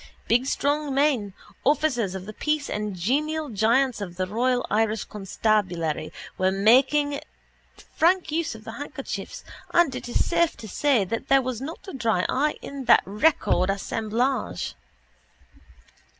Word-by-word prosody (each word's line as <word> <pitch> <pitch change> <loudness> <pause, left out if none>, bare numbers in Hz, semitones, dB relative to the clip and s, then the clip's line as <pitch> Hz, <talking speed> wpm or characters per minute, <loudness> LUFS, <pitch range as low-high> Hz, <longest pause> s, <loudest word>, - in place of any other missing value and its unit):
Big 245 +3 +2
strong 285 0 0
men, 270 -8 +2 0.3
officers 255 -9 +1
of 190 -1 -6
the 215 - -8
peace 300 +4 -1
and 210 -2 -3
genial 300 - -1
giants 235 +3 +2
of 180 -3 -6
the 185 +1 -1
royal 245 +5 0
Irish 215 0 +1
constabulary, 185 -6 -1 0.3
were 185 0 +3
making 265 +8 +3 0.8
frank 355 0 +3
use 320 -5 -1
of 220 - -12
their 225 - -8
handkerchiefs 275 -8 -6 0.3
and 340 -6 +4
it 245 - -6
is - - +1
safe 340 -1 +1
to 220 - -9
say 250 -1 +2
that 230 +7 -4
there 270 -1 +4
was 250 -2 -4
not 315 +8 -7
a - - -7
dry 225 -9 0
eye 295 +3 +1
in 275 -2 -6
that - - +6
record 205 - +2
assemblage. 225 +6 -1
245 Hz, 145 wpm, -25 LUFS, 210-285 Hz, 0.8 s, that